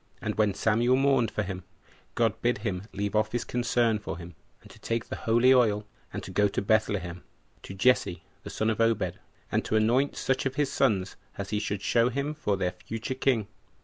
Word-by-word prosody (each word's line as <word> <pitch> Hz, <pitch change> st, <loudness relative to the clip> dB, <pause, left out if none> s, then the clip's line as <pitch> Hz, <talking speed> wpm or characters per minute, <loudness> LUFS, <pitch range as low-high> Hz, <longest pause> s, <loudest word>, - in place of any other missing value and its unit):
And -, -, -2 dB
when 105 Hz, -3 st, +1 dB
Samuel 115 Hz, +4 st, +3 dB
mourned 135 Hz, -3 st, +3 dB
for 105 Hz, -, -2 dB
him, 95 Hz, -1 st, -5 dB, 0.5 s
God 115 Hz, -3 st, +1 dB
bid 120 Hz, -1 st, +2 dB
him 100 Hz, -1 st, -2 dB
leave 100 Hz, +1 st, -3 dB
off 110 Hz, +1 st, +1 dB
his 120 Hz, -1 st, 0 dB
concern 120 Hz, -2 st, +1 dB
for 105 Hz, -, -5 dB
him, 85 Hz, 0 st, -9 dB, 0.3 s
and -, -, -15 dB
to -, -, -16 dB
take 115 Hz, 0 st, -2 dB
the -, -, -5 dB
holy 120 Hz, +3 st, +4 dB
oil, 105 Hz, -5 st, +3 dB, 0.3 s
and 95 Hz, -, -6 dB
go 105 Hz, +2 st, +4 dB
to 100 Hz, -, -2 dB
Bethlehem, 100 Hz, -4 st, 0 dB, 0.4 s
to 95 Hz, -, -9 dB
Jesse 100 Hz, -5 st, +2 dB, 0.2 s
the -, -, -8 dB
son 110 Hz, +1 st, 0 dB
of 110 Hz, -, -1 dB
Obed, 110 Hz, -6 st, +1 dB, 0.3 s
and -, -, +1 dB
to -, -, -1 dB
anoint 120 Hz, +6 st, +2 dB
such 135 Hz, 0 st, 0 dB
of 135 Hz, -, -5 dB
his 145 Hz, -2 st, 0 dB
sons 100 Hz, -8 st, +1 dB, 0.2 s
as 100 Hz, 0 st, -5 dB
he 105 Hz, -, +1 dB
should 100 Hz, -2 st, -3 dB
show 115 Hz, 0 st, +3 dB
him 140 Hz, +4 st, -2 dB
for 130 Hz, -10 st, -1 dB
their 90 Hz, -1 st, 0 dB
future 110 Hz, +8 st, -5 dB
king. 130 Hz, -5 st, +1 dB
110 Hz, 205 wpm, -28 LUFS, 100-120 Hz, 0.5 s, holy